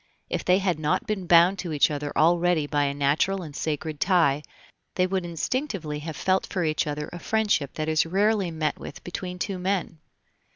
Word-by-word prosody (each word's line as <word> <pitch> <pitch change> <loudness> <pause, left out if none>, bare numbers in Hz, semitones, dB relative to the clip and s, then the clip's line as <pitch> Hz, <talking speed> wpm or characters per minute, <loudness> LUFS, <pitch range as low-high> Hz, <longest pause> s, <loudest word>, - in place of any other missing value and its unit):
If - - -1
they 180 +1 +4
had 185 -4 0
not 155 -1 0
been 195 -4 -3
bound 175 +3 +5
to 175 - -4
each 150 0 +3
other 145 0 -3
already 170 -1 +3
by 145 -1 +1
a 140 - -1
natural 150 +7 +1
and 150 -4 -9
sacred 155 -1 -3
tie, 165 -6 +3 0.5
they 185 - +3
would 190 0 -1
instinctively 170 - -3
have 155 -1 -6
felt 190 0 +1
for 185 -3 -2
each 155 -1 0
other 150 0 -3
a 175 - -6
friendship 210 -10 0
that 155 0 -2
is 155 +1 +2
rarely 200 +1 +2
met 155 -2 -2
with 130 - -9
between 180 0 -5
two 190 0 -3
men. 180 -3 -2
170 Hz, 195 wpm, -25 LUFS, 150-185 Hz, 0.5 s, bound